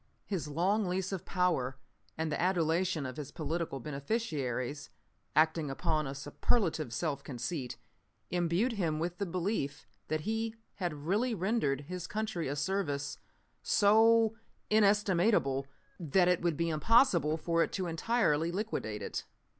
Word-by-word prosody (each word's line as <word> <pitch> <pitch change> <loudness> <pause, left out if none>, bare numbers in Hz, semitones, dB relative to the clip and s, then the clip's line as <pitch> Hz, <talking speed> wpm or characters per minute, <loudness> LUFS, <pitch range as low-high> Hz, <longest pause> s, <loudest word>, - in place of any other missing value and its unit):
"His 185 -7 -3
long 185 +7 +1
lease 185 +1 -1
of 190 -3 -4
power 165 -9 0 0.4
and 160 0 -1
the - - -1
adulation 175 -2 +1
of 130 -1 -6
his 145 -2 -5
political 160 -2 -3
beneficiaries, 140 - -3 0.5
acting 160 0 +3
upon 155 +2 0
a 135 - -5
superlative 155 - 0
self 140 +3 -2
conceit, 125 +1 -4 0.5
imbued 175 +7 +1
him 170 -8 -1
with 175 +2 -3
the 200 - -1
belief 170 -5 -2 0.2
that 155 0 -1
he 225 +4 -2 0.2
had 150 -6 -3
really 220 +7 +1
rendered 185 - 0
his 180 +4 -6
country 215 -7 -2
a 140 - -2
service 145 -3 -2 0.4
so 225 +2 +5 0.4
inestimable 200 -9 +3 0.3
that 175 +2 +3
it 180 -1 +3
would 170 -4 0
be 170 0 +1
impossible 165 - +4
for 165 +1 +1
it - - +1
to 190 - -1
entirely 165 -2 +1
liquidate 175 - -3
it. - - -4
170 Hz, 140 wpm, -32 LUFS, 145-200 Hz, 0.5 s, so